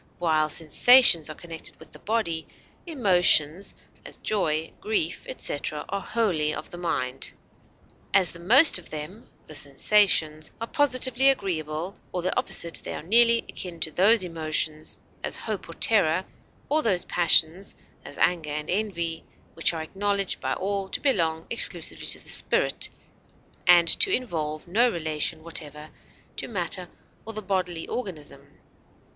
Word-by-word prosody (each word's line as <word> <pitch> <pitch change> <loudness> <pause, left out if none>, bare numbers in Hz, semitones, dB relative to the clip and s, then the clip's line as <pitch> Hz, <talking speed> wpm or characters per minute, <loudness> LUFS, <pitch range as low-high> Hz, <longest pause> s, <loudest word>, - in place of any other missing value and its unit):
While 155 -3 +1
sensations 170 - +5
are 155 - -7
connected 165 -1 -8
with - - -15
the - - -15
body, 205 -8 -2 0.4
emotions, 185 - +2 0.3
as - - -8
joy, 160 -7 -1
grief, 410 +1 -2
etc., - - -3
are 200 - -3
wholly 175 -11 0
of - - -8
the 175 - -9
mind. 135 -7 -3 0.8
"As 190 -3 +2
the 170 - -12
most 245 - +6
of 175 - -11
them 155 +9 -8 0.2
[the - - -12
sensations] 155 +1 +2
are 230 - -3
positively 260 -1 +3
agreeable 175 - -2 0.2
or 180 - -4
the 185 - -1
opposite, 170 -1 -2
they - - -5
are - - -7
nearly 230 +5 +5
akin 175 -3 -7
to 160 - -1
those 200 +5 +4
emotions, 155 -2 0 0.3
as - - -2
hope 215 -6 -6
or 165 - -9
terror, 185 -4 +2 0.4
or 305 +2 +2
those 190 -9 0
passions, 175 +2 +2 0.3
as - - -9
anger 165 -4 +1
and 150 +2 -4
envy, 175 -5 -2 0.3
which 165 - +2
are 160 -2 -5
acknowledged 200 +3 -2
by 130 0 -2
all 195 0 -3
to - - -3
belong 165 - 0
exclusively 180 -7 0
to - - +1
the - - -19
spirit, - - +2 0.8
and 175 -1 +6
to 385 - +7
involve 155 - -3
no 230 +8 +3
relation 155 -3 -2
whatever 155 -2 -4 0.5
to - - -4
matter 180 -3 -3 0.3
or 225 - -8
the 215 0 -7
bodily 180 -4 -2
organism. 150 - -8
175 Hz, 145 wpm, -25 LUFS, 160-210 Hz, 0.8 s, to